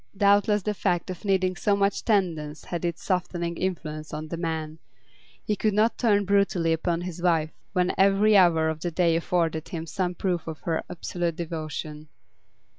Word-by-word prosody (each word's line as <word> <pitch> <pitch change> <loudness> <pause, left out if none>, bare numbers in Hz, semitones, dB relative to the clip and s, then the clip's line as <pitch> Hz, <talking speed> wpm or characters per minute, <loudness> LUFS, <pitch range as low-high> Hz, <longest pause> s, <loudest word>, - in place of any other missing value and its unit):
Doubtless 205 0 +4
the 210 - -1
fact 180 -3 -1
of 180 - -8
needing 185 -2 +1
so 205 +3 +1
much 200 0 0
tendance 165 -8 0
had 175 -1 -4
its 170 -2 -3
softening 175 -2 -1
influence 155 -4 -4
on 155 +1 -6
the 170 - -3
man; 160 -2 -4 0.6
he 210 - 0
could 210 0 0
not 220 +2 +3
turn 205 -4 +3
brutally 195 -4 +2
upon 165 +1 -1
his 175 -1 -6
wife 165 -3 +2 0.2
when 180 -1 +1
every 200 +2 +5
hour 170 -4 +5
of 160 -1 -2
the 175 - -2
day 170 0 +2
afforded 165 -2 0
him 165 -4 -4
some 180 +1 -2
proof 175 -3 -2
of 160 -1 -6
her 165 -2 -1
absolute 175 -1 -3
devotion. 155 -2 -5
175 Hz, 175 wpm, -26 LUFS, 160-195 Hz, 0.6 s, every